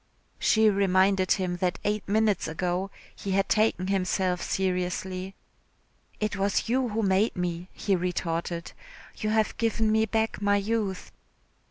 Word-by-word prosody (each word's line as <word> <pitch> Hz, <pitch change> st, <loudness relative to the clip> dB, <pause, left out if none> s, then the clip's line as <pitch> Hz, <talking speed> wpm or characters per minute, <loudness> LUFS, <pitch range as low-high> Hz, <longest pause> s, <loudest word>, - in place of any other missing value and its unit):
She 220 Hz, 0 st, +4 dB
reminded 195 Hz, -1 st, +3 dB
him 180 Hz, -2 st, -2 dB
that 180 Hz, 0 st, 0 dB
eight 210 Hz, 0 st, -1 dB
minutes 215 Hz, -2 st, +2 dB
ago 180 Hz, +4 st, -2 dB, 0.3 s
he 195 Hz, -, -4 dB
had 195 Hz, 0 st, +2 dB
taken 215 Hz, -4 st, +2 dB
himself 185 Hz, -1 st, 0 dB
seriously. 185 Hz, 0 st, -2 dB, 0.8 s
"It 215 Hz, -1 st, -1 dB
was 195 Hz, +1 st, 0 dB
you 250 Hz, +1 st, +1 dB
who 220 Hz, +1 st, -1 dB
made 195 Hz, +3 st, +2 dB
me," 180 Hz, 0 st, -3 dB
he 200 Hz, -, 0 dB
retorted, 170 Hz, -1 st, -2 dB, 0.5 s
"you 215 Hz, -, -2 dB
have 220 Hz, 0 st, +1 dB
given 225 Hz, -1 st, +1 dB
me 220 Hz, 0 st, +3 dB
back 220 Hz, 0 st, -1 dB
my 205 Hz, 0 st, +3 dB
youth." 205 Hz, -2 st, -2 dB
195 Hz, 140 wpm, -27 LUFS, 180-215 Hz, 0.8 s, She